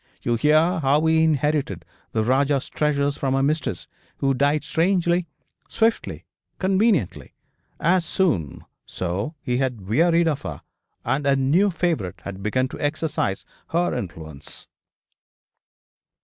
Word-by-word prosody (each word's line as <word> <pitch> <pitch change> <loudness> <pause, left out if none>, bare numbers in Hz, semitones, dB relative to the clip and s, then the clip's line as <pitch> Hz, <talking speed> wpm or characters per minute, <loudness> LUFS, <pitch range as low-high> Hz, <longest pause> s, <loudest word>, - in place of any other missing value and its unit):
You 120 - +1
hear 155 +8 +3
how 145 +2 +2
he 160 0 +4
inherited 145 - 0 0.3
the 110 - 0
Rajah's 135 +3 +1
treasures 145 -2 0
from 135 -1 0
a 135 - +2
mistress 150 - -1 0.3
who 135 -1 +1
died 145 +3 +1
strangely, 175 0 +1 0.4
swiftly, 225 +1 0 0.3
conveniently, 190 - +1 0.4
as 175 +2 +3
soon 150 - -1 0.2
so 95 - -3
he 125 -2 0
had 125 -7 -2
wearied 165 - +3
of 150 -4 0
her, 75 -7 -7 0.4
and 135 +4 0
a 140 - +4
new 150 +10 +3
favourite 160 - -2
had 100 -1 -7
begun 130 +6 0
to - - -9
exercise 145 -9 -1 0.2
her 175 +2 0
influence. 80 -5 -7
145 Hz, 125 wpm, -23 LUFS, 120-165 Hz, 0.4 s, he